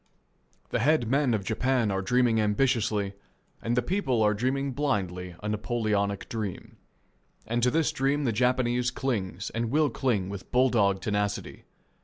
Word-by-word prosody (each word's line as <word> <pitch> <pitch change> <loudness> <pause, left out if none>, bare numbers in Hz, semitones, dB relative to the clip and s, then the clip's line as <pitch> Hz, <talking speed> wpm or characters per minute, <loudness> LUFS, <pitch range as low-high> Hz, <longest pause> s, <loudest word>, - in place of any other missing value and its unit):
The - - 0
head 145 -1 +2
men 135 -1 +2
of 100 - -3
Japan 120 +1 +1
are 95 0 -1
dreaming 120 +2 +2
ambitiously, 105 -2 +1 0.5
and 120 +1 -1
the 125 - +3
people 130 - +1
are 105 0 +4
dreaming 135 +5 -1
blindly, 95 -11 -2
a - - -3
Napoleonic 105 -2 -1
dream. 110 -6 -5 0.7
And 120 +2 -1
to 125 - +4
this 160 +4 +1
dream 140 +2 0
the 125 - +1
Japanese 125 +1 +1
clings 110 -7 -3
and 115 0 -2
will 150 +1 +2
cling 115 -7 0
with 100 -1 -7
bull 125 0 +4
dog 100 -4 +2
tenacity. 105 -1 -2
115 Hz, 155 wpm, -27 LUFS, 105-130 Hz, 0.7 s, are